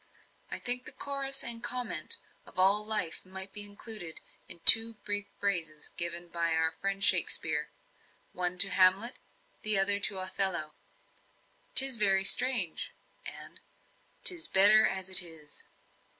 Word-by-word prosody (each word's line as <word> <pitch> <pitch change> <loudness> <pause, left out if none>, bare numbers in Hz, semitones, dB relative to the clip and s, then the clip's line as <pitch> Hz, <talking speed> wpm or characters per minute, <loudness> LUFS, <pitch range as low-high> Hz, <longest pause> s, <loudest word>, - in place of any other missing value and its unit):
"I - - -7
think 250 0 +1
the - - -7
chorus 275 -1 -4
and 235 -1 -3
comment 250 0 -2 0.3
on - - -9
all 195 +3 +2
life 210 -6 -3
might 190 +1 -10
be 205 - 0
included 205 -4 -7 0.3
in - - -10
two 225 +3 +7
brief 205 -1 -4
phrases 165 -6 -5
given 170 0 -2
by 170 -1 -4
our 160 0 -2
friend 195 +4 -6
Shakspeare, - - 0 0.6
one 180 0 -6
to 195 +2 +3
Hamlet, 190 +6 0 0.4
the 215 -1 +4
other 200 +1 +2
to 200 -1 0
Othello: 185 -4 -1 1.0
''Tis 265 -2 +8
very 195 -2 0
strange,' 230 -6 +1 0.3
and - - -9 0.6
''Tis 350 -3 +4
better 210 +3 +5
as 190 -1 -6
it 185 0 +9
is.'" 160 -4 -12
195 Hz, 135 wpm, -27 LUFS, 180-220 Hz, 1.0 s, it